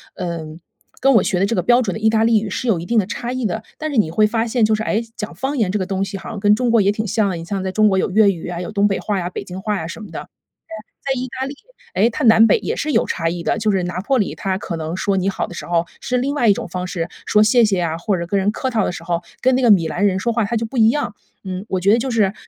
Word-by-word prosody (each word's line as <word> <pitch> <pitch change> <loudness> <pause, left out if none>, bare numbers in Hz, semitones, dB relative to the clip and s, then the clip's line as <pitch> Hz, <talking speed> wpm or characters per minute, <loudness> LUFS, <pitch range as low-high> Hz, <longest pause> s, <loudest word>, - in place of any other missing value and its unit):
嗯， 165 -3 -5 0.4
跟 270 +1 +4
我 205 - +5
学 180 - 0
的 195 - +2
这 230 - -1
个 180 - 0
标 245 +6 +4
准 195 -6 -2
的 - - -5
意 220 0 +3
大 220 0 +2
利 225 -1 +4
语 210 - -4
是 255 - -3
有 190 -7 +2
一 170 - -6
定 230 +1 +2
的 190 - 0
差 240 +3 -4
异 255 -3 -2
的， 220 +3 -4 0.2
但 310 0 -3
是 275 - -2
你 195 -7 +2
会 210 +5 +3
发 225 +1 0
现 235 0 0
就 220 - +2
是， 215 - -3
诶， 220 +1 0 0.2
讲 210 -1 -5
方 275 +1 -3
言 200 -6 +1
这 210 - -1
个 185 - -2
东 195 0 -1
西 195 - -7
好 - - -9
像 215 - -5
跟 205 +1 +4
中 245 +2 +1
国 230 -1 +4
也 195 - +3
挺 215 +1 -3
像。 200 -3 0
你 165 - -7
像 195 +2 -3
在 190 - -2
中 215 +2 +3
国 190 - +1
有 190 - 0
粤 205 0 +5
语 170 -3 -7
啊， 175 0 -4
有 180 - -5
东 205 0 +2
北 195 - -1
话 205 -2 -2
呀， 175 0 -3
北 - - -5
京 185 +1 -8
话 210 +1 -1
呀 160 - -5
什 195 - -8
么 - - -11
的。 - - -7 0.7
对 270 - -1
啊， - - -4
在 250 - -3
意 255 - -3
大 265 - -1
利， 275 - -6 0.4
诶， 230 - +4
它 290 - -3
南 225 0 +7
北 210 - +4
也 - - -3
是 305 - -2
有 - - +2
差 165 -1 -1
异 170 0 -4
的。 210 - 0
就 215 -1 +1
是 190 -2 0
拿 180 +1 -3
坡 270 +4 +1
里 205 - -1
他 190 -1 -2
可 185 -3 -5
能 160 +1 -4
说 200 0 0
你 190 +1 +1
好 - - -3
的 - - -10
时 - - -6
候 170 0 +1 0.2
是 250 - -1
另 275 +4 -1
外 240 -5 +2
一 - - +7
种 - - -5
方 180 +1 -4
式， 170 -3 -3 0.2
说 210 - +3
谢 225 +3 +5
谢 195 -5 +2
啊， 165 -1 -1
或 190 +3 -1
者 170 0 -4
跟 200 +3 0
人 200 +2 +1
客 260 - -3
套 225 -4 +1
的 - - -1
时 170 - -7
候， 170 0 -1 0.2
跟 260 0 +3
那 260 - +1
个 240 -4 +5
米 170 -5 +4
兰 180 +5 0
人 190 -2 +2
说 235 +5 -1
话 230 -1 +1
他 230 +3 -1
就 225 - -2
不 255 +4 -7
一 220 -1 +6
样。 235 -4 -1 0.3
嗯， 185 +2 -5
我 185 - 0
觉 200 +4 +4
得 - - +5
就 255 +2 -2
是， 225 -3 +3
呃 190 - -3
205 Hz, 365 characters per minute, -20 LUFS, 185-230 Hz, 0.7 s, 南